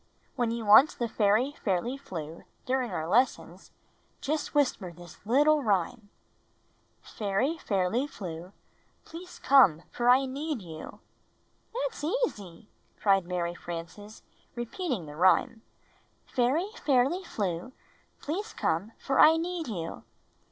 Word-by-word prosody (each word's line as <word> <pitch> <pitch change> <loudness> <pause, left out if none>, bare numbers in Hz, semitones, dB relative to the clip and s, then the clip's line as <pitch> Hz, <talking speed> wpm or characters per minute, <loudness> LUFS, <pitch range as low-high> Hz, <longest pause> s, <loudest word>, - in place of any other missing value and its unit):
"When 240 -2 0
you 230 -1 -3
want 215 +9 +7
the 240 - -1
fairy 220 +5 +2
Fairly 200 +6 0
Flew 165 - -8 0.2
during 255 -1 0
our 160 -4 -3
lessons, 245 +9 0 0.5
just 305 +1 -3
whisper 250 -10 +1
this 175 0 -14
little 295 +5 +4
rhyme: 205 0 -1 0.5
" - - -41
'Fairy 220 +10 -1
Fairly 205 +6 0
Flew, 180 - -8 0.5
Please 355 +3 -10
come, 210 - +5
for 240 0 +1
I 260 +2 +6
need 280 -2 -4
you.' 160 -2 -10 0.4
" - - -41
"That's - - -3
easy!" 225 - -3 0.3
cried 195 -3 +3
Mary 175 -1 -2
Frances, 175 +5 -8 0.3
repeating 240 - -3
the 150 0 -10
rhyme: 185 +6 +3 0.6
"Fairy 270 +10 0
Fairly 280 +7 +2
Flew, 195 - -3 0.5
Please 405 +9 -4
come, 190 +8 -1
for 270 - -1
I 320 +1 +8
need 340 0 -3
you." 170 -7 -5
230 Hz, 125 wpm, -28 LUFS, 180-285 Hz, 0.6 s, I